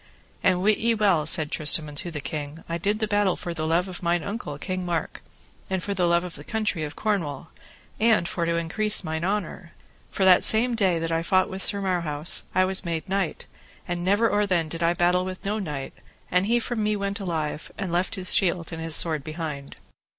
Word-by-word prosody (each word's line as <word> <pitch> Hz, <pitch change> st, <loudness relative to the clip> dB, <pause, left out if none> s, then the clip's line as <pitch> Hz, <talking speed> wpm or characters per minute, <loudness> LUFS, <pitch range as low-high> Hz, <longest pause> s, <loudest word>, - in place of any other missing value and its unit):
And 185 Hz, 0 st, +2 dB
wit 210 Hz, +1 st, +3 dB
ye 230 Hz, 0 st, +2 dB
well, 190 Hz, -8 st, +2 dB
said 160 Hz, -2 st, 0 dB
Tristram 155 Hz, +1 st, +3 dB
unto 150 Hz, +4 st, -6 dB
the 155 Hz, -3 st, -5 dB
king, 150 Hz, +2 st, -6 dB
I 170 Hz, +1 st, -3 dB
did 205 Hz, +5 st, 0 dB
the 215 Hz, 0 st, -1 dB
battle 205 Hz, -3 st, +2 dB
for 175 Hz, -, -5 dB
the 155 Hz, -1 st, -3 dB
love 170 Hz, +3 st, +2 dB
of 180 Hz, -1 st, -7 dB
mine 170 Hz, -1 st, +1 dB
uncle, 200 Hz, -, -5 dB
King 185 Hz, +4 st, -4 dB
Mark, 170 Hz, -3 st, -3 dB, 0.5 s
and 190 Hz, -2 st, -1 dB
for 200 Hz, -, -2 dB
the 180 Hz, -2 st, +1 dB
love 170 Hz, 0 st, +3 dB
of 180 Hz, -2 st, -7 dB
the -, -, -10 dB
country 215 Hz, -6 st, -1 dB
of 150 Hz, -1 st, -5 dB
Cornwall, 165 Hz, -9 st, -2 dB, 0.5 s
and 220 Hz, -5 st, +3 dB
for 170 Hz, -3 st, -2 dB
to 170 Hz, -, +1 dB
increase 210 Hz, +6 st, 0 dB
mine 160 Hz, 0 st, -3 dB
honour; 185 Hz, -2 st, -3 dB, 0.4 s
for 190 Hz, -, 0 dB
that 185 Hz, -1 st, +7 dB
same 235 Hz, +3 st, +6 dB
day 190 Hz, -6 st, +2 dB
that 165 Hz, 0 st, -2 dB
I 165 Hz, 0 st, +1 dB
fought 185 Hz, +2 st, +2 dB
with 190 Hz, +1 st, -5 dB
Sir 200 Hz, +2 st, +2 dB
Marhaus 170 Hz, -5 st, +1 dB
I 185 Hz, 0 st, +4 dB
was 190 Hz, +1 st, +3 dB
made 170 Hz, 0 st, -3 dB
knight, 195 Hz, -3 st, -2 dB, 0.4 s
and 175 Hz, 0 st, -3 dB
never 205 Hz, +5 st, +3 dB
or 205 Hz, -1 st, +1 dB
then 170 Hz, -4 st, 0 dB
did 165 Hz, +2 st, -6 dB
I 170 Hz, +1 st, +2 dB
battle 180 Hz, +1 st, +2 dB
with 185 Hz, +1 st, -7 dB
no 210 Hz, +2 st, -1 dB
knight, 150 Hz, -8 st, -5 dB, 0.4 s
and 180 Hz, +2 st, +2 dB, 0.2 s
from 240 Hz, -3 st, -2 dB
me 210 Hz, -, +1 dB
he 210 Hz, -, +1 dB
went 200 Hz, +1 st, -3 dB
alive, 160 Hz, -5 st, -3 dB
and 190 Hz, -3 st, -3 dB
left 175 Hz, +2 st, 0 dB
his 185 Hz, -1 st, -2 dB
shield 175 Hz, -3 st, +1 dB
and 165 Hz, -, -5 dB
his 165 Hz, -1 st, 0 dB
sword 155 Hz, -4 st, +1 dB
behind. 155 Hz, -3 st, -6 dB
180 Hz, 220 wpm, -25 LUFS, 165-200 Hz, 0.5 s, that